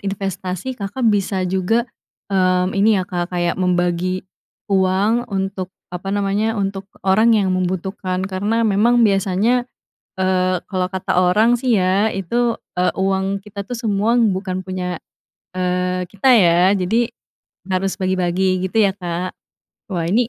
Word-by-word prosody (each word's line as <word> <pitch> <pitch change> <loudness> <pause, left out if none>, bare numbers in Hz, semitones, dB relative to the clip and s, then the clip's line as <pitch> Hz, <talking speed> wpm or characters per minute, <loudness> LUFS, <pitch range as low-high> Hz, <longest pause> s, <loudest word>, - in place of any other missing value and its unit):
investasi, 195 +2 -4
Kakak 225 +2 -4
bisa 195 -2 0
juga, 190 +6 +1 0.5
mmm, 185 -1 +2
ini, 205 +2 +3
ya, 185 - 0
Kak, 175 -1 -3
kayak 175 0 -1
membagi 180 0 0 0.5
uang 195 +6 +2
untuk 195 -2 -3 0.2
apa 180 +2 -5
namanya, 205 +3 0
untuk 195 -1 -3 0.2
orang 220 +4 +4
yang 195 -3 +1
membutuhkan, 185 +1 -2
karena 205 +4 0
memang 230 +3 +4
biasanya, 205 +5 +1 0.5
eee, 185 -1 +1
kalau 185 -2 0
kata 185 -1 -1
orang, 210 +7 +4
sih, 245 0 0
ya, 195 +4 +2
itu, 230 +6 0 0.2
eee, 180 0 +2
uang 195 +1 -1
kita, 200 -1 -8
tuh, 245 - -6
semua 220 -1 0
bukan 190 -5 +1
punya, 185 -1 -4 0.5
eee, 180 0 -1
kita, 245 +6 +4
ya, 175 -5 +5 0.2
jadi 220 +5 +1 0.6
harus 185 +1 0
bagi-bagi, 185 0 +1
gitu, 190 - -17
ya, 200 -2 +4
Kak. 180 -1 -4 0.6
Wah, 170 -2 -1
ini 225 +5 +2
190 Hz, 135 wpm, -19 LUFS, 185-210 Hz, 0.6 s, ya